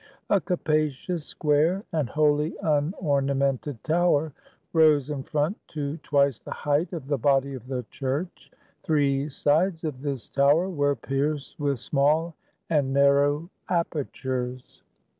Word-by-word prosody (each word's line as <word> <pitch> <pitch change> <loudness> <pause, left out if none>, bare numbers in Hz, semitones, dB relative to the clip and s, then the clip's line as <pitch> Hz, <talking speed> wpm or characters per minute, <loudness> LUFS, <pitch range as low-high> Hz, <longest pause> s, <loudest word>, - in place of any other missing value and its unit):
A 200 - +4
capacious, 155 -2 -1
square, 160 +6 +1
and 155 -6 -1
wholly 150 +1 +2
unornamented 140 - 0
tower 160 -2 +2 0.4
rose 155 -3 +4
in 140 -2 -3
front 150 +7 -1 0.2
to 145 +1 -2
twice 140 -5 +1
the - - -12
height 150 +4 0
of 165 -7 -5
the 140 -1 -1
body 140 +2 +2
of 130 -2 -9
the 130 -2 -3
church; 140 +7 -4 0.3
three 145 -2 +1
sides 160 +5 +1
of 145 -5 -4
this 140 -4 -4
tower 145 +6 +3
were 145 -5 +1
pierced 140 +4 -3
with 140 -2 0
small 150 +6 +1 0.4
and 145 -4 +2
narrow 140 +3 +3 0.2
apertures. 130 -7 -3
145 Hz, 125 wpm, -26 LUFS, 140-155 Hz, 0.4 s, A